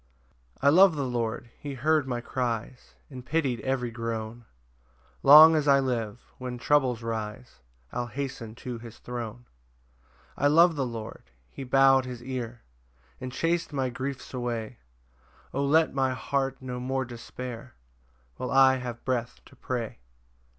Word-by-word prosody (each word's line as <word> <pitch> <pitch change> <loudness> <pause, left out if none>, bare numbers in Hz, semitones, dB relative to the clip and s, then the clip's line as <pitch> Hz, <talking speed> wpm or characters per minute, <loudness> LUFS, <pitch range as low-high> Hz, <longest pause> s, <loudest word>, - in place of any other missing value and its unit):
1 140 +1 +5
I - - +4
love 190 -2 +7
the 140 -2 -1
Lord; 120 -1 -3
he 140 -2 -6
heard 150 +2 +2
my 120 -2 -2
cries, 120 0 -4 0.2
And 130 -2 -8
pity'd 135 -4 0
every 125 -1 -2
groan: 115 0 -5 0.8
Long 155 - +10
as 150 -2 +1
I 140 -1 +6
live, 120 -4 -2 0.2
when 125 -1 -5
troubles 125 -3 +2
rise, 115 - -5 0.3
I'll 120 0 -3
hasten 130 -4 -5
to 125 -2 -4
his 115 -1 -11
throne. 120 -1 -7 0.9
2 - - +1
I - - +8
love 165 +3 +5
the 135 -3 -1
Lord; 110 - -8 0.2
he 135 - -7
bow'd 135 0 +5
his 125 -2 -7
ear, 120 -2 -5 0.6
And 130 -1 -6
chas'd 165 +3 -1
my 130 -2 -1
griefs 135 +3 -5
away; 120 -2 -4 0.7
O 140 - 0
let 155 +3 +3
my 130 -1 +1
heart 135 +1 -2
no 125 -1 -5
more 130 +1 -2
despair, 120 +1 -8 0.6
While 125 - -4
I 135 -1 +5
have 120 -2 -7
breath 125 -2 -2
to 130 - -17
pray! 120 - -4
125 Hz, 150 wpm, -27 LUFS, 120-135 Hz, 0.9 s, Long